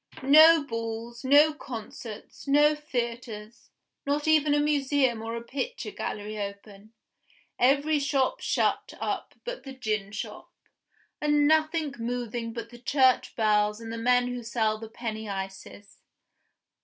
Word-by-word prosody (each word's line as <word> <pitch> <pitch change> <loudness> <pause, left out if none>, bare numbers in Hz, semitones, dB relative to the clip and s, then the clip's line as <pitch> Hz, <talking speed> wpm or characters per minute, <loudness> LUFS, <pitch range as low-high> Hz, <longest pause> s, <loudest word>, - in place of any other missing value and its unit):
No 310 +3 +8
balls, 230 -1 -5
no 290 +4 +6
concerts, 225 -3 -9
no 295 +2 +5
theaters, 235 -6 -5 0.3
not 290 +2 -1
even 305 -2 +4
a - - +3
museum 280 -5 +1
or 225 +1 -4
a 235 - -5
picture 285 - -4
gallery 210 +1 -5
open; 200 +1 -8 0.7
every 285 +4 +3
shop 275 -2 0
shut - - 0
up - - -3
but - - -5
the 270 - -9
gin 215 -6 -3
shop; 210 - -7 0.7
and 295 -1 +3
nothing 310 -1 +2
moving 235 -1 -3
but 230 0 -7
the 240 - -12
church 260 0 +2
bells 210 -1 +2
and 225 0 -7
the - - -4
men 245 +1 +3
who 245 0 -4
sell 220 -2 -1
the 225 0 -8
penny 220 -2 -5
ices. 195 +1 -7
240 Hz, 135 wpm, -27 LUFS, 220-290 Hz, 0.7 s, No